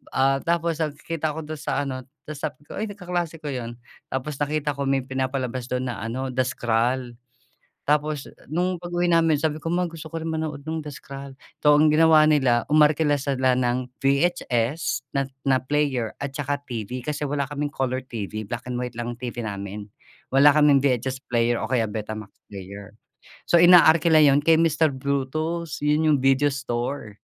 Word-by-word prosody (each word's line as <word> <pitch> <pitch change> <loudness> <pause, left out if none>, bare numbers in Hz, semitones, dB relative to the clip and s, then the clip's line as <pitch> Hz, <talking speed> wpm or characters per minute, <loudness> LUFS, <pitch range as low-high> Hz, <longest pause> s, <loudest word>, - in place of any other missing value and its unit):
Ah, 135 +1 +3
tapos 170 0 -1
nagkikita 155 0 -3
ko 160 - -5
do'n 155 0 -7
sa 145 - -1
ano, 130 -2 -5 0.2
ta's 150 -2 -8
sabi 150 -2 -5
ko, 150 - -8
"Ay 215 - -2
nag 205 - -8
kaklase 175 -4 -4
ko 145 - -3
yun." 120 -3 -5 0.3
Tapos 135 +2 -4
nakita 150 0 0
ko 140 -1 -3
may 135 -1 +1
pinapalabas 130 -1 -3
do'n 125 0 -2
na 110 - -7
ano 130 +4 -4
The 130 0 0
Scroll, 120 +1 -1 0.7
tapos 150 -1 0 0.2
nung 175 +3 -1
pag-uwi 175 0 -1
namin 165 -2 +4
sabi 155 0 0
ko, 165 - -2
"Ma 180 +1 +1
gusto 165 -1 -9
ko 165 - -4
rin 160 - -4
manood 155 -3 -3
nung 160 0 -2
The 150 - -6
Scroll." 135 0 -10 0.3
So, 150 - +6
ang 155 +1 +5
ginawa 155 -1 +6
nila 130 -6 +3
umarkila 150 0 +4 0.4
ng 125 0 0 0.2
VHS 140 -3 0
na 140 - +2 0.2
na 135 -1 +4
player 130 -5 0
at 140 -1 -4
saka 145 0 -2
TV, 120 +1 -5
kasi 150 0 -2
wala 140 -1 -1
kaming 145 0 -3
color 130 -1 -1
TV, 110 -3 -5
black 120 - -5
and 125 - -3
white 125 -2 -5
lang 120 0 -3
ang 120 - -15
TV 120 -1 -5
namin, 100 0 -5 0.5
wala 140 +2 +7
kaming 150 -2 +5
VHS 130 -1 0
player 120 0 +1
o 110 - -4
kaya 125 -3 +2
Betamax 110 -1 -6 0.2
player. 100 +1 -9 0.6
So 170 - +6
inaarkila 170 -2 +7
yun 140 -1 +5
kay 165 - +7
Mister 160 -1 +3
Bruto's 145 +4 -2
yun 150 +2 +2
yung - - +2
video 135 +2 +4
store. 120 -4 -4
140 Hz, 180 wpm, -24 LUFS, 125-155 Hz, 0.7 s, wala